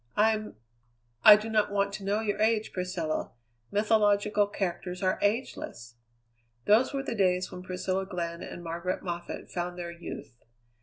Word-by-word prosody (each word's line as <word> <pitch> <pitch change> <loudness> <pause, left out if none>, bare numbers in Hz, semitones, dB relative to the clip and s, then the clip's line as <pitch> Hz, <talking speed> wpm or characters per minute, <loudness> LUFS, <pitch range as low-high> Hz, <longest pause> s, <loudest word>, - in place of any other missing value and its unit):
"I'm 215 0 +2 0.3
" - - -40 0.3
"I 210 - +12
do 215 +1 -3
not 215 -2 +2
want 200 0 +1
to 200 - -6
know 205 +2 0
your 210 -1 -1
age, 220 0 +2
Priscilla. 180 -4 -2 0.4
Mythological 210 -1 +3
characters 180 -2 -3
are 185 - +1
ageless." 200 - -2 0.7
Those 220 +5 +5
were 275 -1 -2
the 255 - -3
days 185 -3 +1
when 180 - -7
Priscilla 185 +1 -2
Glenn 170 -3 -4
and 175 - -7
Margaret 170 +2 -3
Moffatt 175 -1 -5
found 175 0 -3
their 170 -1 -5
youth. 170 -6 -8
195 Hz, 155 wpm, -29 LUFS, 175-210 Hz, 0.7 s, I